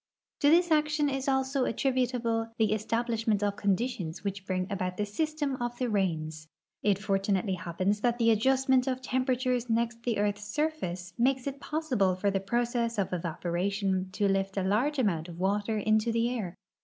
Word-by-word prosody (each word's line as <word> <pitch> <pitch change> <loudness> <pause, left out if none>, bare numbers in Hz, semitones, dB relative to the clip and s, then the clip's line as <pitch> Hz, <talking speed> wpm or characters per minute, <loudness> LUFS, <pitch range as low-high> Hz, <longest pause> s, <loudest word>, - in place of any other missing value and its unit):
To 290 - +4
this 345 +2 +4
action 300 -1 +3
is 270 0 -3
also 265 0 +1
attributable 245 -2 0
the 220 -2 +3
establishment 225 -1 0
of 205 -1 0
conditions 200 -4 -1
which 195 -1 -4
bring 185 -1 0
about 185 -2 -2
the 210 - 0
system 290 +5 -2
of 240 0 -3
the 250 -1 -1
rains. 160 -6 -1 0.3
It 200 -2 +2
fortunately 195 -1 0
happens 185 +4 -1
that 240 0 +2
the 230 -1 +4
adjustment 260 +3 +3
of 260 0 -2
tem 255 +1 -1
peratures 250 -1 0
next 230 +1 0
the 235 -2 -1
earth's 205 0 0
surface 210 - -2
makes 260 +1 +2
it 280 0 -4
possible 255 - 0
for 200 +2 0
the 195 - 0
process 235 +2 -1
of 195 -2 -1
evaporation 185 +3 -1
to 200 +1 +1
lift 195 0 0
a 195 - +1
large 235 +10 +1
amount 180 -9 0
of 170 - -9
water 205 +3 0
into 215 +2 +2
the 230 +1 +1
air. 190 -7 -4
220 Hz, 175 wpm, -29 LUFS, 195-255 Hz, 0.3 s, To